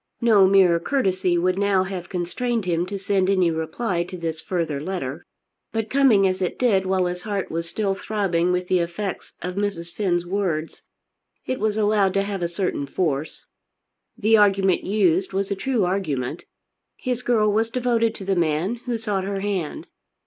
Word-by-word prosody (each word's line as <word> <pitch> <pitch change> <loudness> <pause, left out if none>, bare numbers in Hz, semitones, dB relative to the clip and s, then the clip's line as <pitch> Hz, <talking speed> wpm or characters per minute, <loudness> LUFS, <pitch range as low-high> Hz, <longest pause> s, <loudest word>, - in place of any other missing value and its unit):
No 215 -5 +5
mere 185 -3 +5
courtesy 185 -6 +1
would 185 +2 +1
now 200 -2 +3
have 190 -1 -6
constrained 215 +5 -2
him 175 0 0
to 200 +1 -4
send 195 -1 +1
any 185 -3 +3
reply 170 +3 -2
to 180 +1 -8
this 165 -2 -4
further 165 -6 -2
letter. 160 -3 -4 0.5
But 225 -1 -3
coming 255 -8 +5
as 185 0 0
it 180 - -1
did 195 -7 +2
while 185 -1 +2
his 180 0 -3
heart 200 -2 -3
was 165 +1 -3
still 200 +2 0
throbbing 190 -4 0
with 180 0 -1
the 185 - +2
effects 175 +3 -4
of 180 0 -3
Mrs. 195 -4 -3
Finn's 175 -4 0
words, 175 -4 -2 0.6
it 260 - -2
was 215 0 0
allowed 205 -3 +2
to 195 - +2
have 200 -2 -4
a 170 - +1
certain 170 -5 -2
force. 150 -2 -2 0.7
The 220 -1 +4
argument 195 -3 +3
used 190 -2 +1
was 195 +1 -1
a - - +1
true 230 0 0
argument. 155 -7 -2 0.5
His 250 -2 -2
girl 220 -4 +2
was 225 +2 +1
devoted 230 -2 +1
to 195 - -8
the 195 0 +1
man 170 +6 0
who 240 -2 0
sought 205 -4 -2
her 195 0 -3
hand. 195 -6 -3
190 Hz, 180 wpm, -23 LUFS, 175-210 Hz, 0.7 s, No